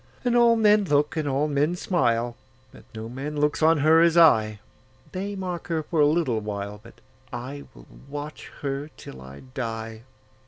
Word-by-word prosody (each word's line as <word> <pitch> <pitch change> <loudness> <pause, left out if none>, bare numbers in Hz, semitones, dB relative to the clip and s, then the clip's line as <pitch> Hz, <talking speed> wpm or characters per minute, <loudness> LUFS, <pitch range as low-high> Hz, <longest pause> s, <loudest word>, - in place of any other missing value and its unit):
And 245 -1 +2
all 235 -1 +5
men 210 -2 +4
look, 150 -1 +1
and 155 -2 -1
all 140 +2 +1
men 150 +4 +1
smile, 120 -10 0 0.4
But - - -16
no 110 0 -6
man 140 +5 -5
looks 150 +1 +1
on 160 +1 +5
her 160 +1 +6
as 170 0 +4
I:They 160 - +1
mark 180 -3 -5
her 160 -2 -1
for 160 +1 -2
a 145 - +6
little 150 -7 +1
while, 105 -1 -5
But 115 - -16 0.4
I 130 +4 -7
will - - -14 0.2
watch 145 +1 -7
her 140 +1 -3
till 65 - -11
I 65 +1 -11
die. 115 -3 -5
145 Hz, 170 wpm, -25 LUFS, 115-165 Hz, 0.4 s, her